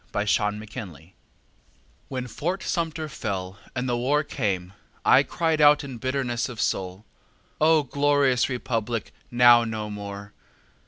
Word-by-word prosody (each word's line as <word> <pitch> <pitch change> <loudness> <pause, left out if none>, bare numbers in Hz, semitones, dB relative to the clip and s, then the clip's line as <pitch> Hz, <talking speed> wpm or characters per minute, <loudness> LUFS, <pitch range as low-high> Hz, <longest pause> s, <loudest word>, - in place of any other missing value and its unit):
Jacob 105 0 +1
Goodpasture 95 - -9 1.0
When 130 -1 -4
Fort 175 +10 -3
Sumter 165 -2 -2
fell 100 -7 -5 0.2
and 125 0 -2
the 120 - 0
war 140 +5 +1
came 95 -10 -3 0.3
I - - +7
cried 160 -2 0
out 150 0 +6
in 130 -4 -7
bitterness 130 -2 -1
of 120 -4 -9
soul: 95 -1 -2 0.6
"O 155 -1 +5
glorious 140 -2 +2
republic 115 -3 -3 0.2
now 120 -1 +6
no 110 -2 -4
more!" 100 0 -7
120 Hz, 125 wpm, -25 LUFS, 105-140 Hz, 1.0 s, I